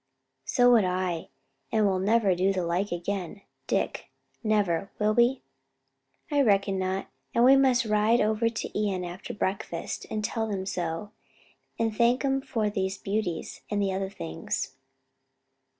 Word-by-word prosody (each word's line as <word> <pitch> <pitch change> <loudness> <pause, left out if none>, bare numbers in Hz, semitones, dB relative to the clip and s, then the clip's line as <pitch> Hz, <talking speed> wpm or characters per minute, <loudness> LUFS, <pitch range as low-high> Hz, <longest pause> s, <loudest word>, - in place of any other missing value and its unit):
"So 245 0 +4
would 230 -4 +6
I: 180 -2 -1 0.4
and 215 -1 +3
we'll 190 -2 +2
never 205 0 +3
do 185 +2 +2
the 185 -3 -1
like 180 +4 -1
again, 185 +2 -4 0.2
Dick, - - -1 0.3
never; 200 -4 +1
will 210 0 +2
we?" 240 +4 +3 0.9
"I 290 -1 +3
reckon 195 -5 +2
not: 190 +1 -2 0.3
and 235 - +5
we 265 +2 +8
must 260 -2 +4
ride 215 +2 +3
over 220 +2 +2
to 230 - -4 0.2
Ion 185 -2 -2
after 175 +2 -7
breakfast, 190 -4 -3
and 215 -1 -2
tell 220 -1 -2
'em 190 -2 -2
so, 175 +1 -3 0.7
and 225 -1 0
thank 240 +4 +3
'em 270 0 +1
for 230 -6 -1
these 195 -2 -1
beauties 195 -5 -3
and 210 - 0
the 195 -1 +1
other 190 0 -2
things." 165 -7 -4
205 Hz, 150 wpm, -27 LUFS, 185-225 Hz, 0.9 s, we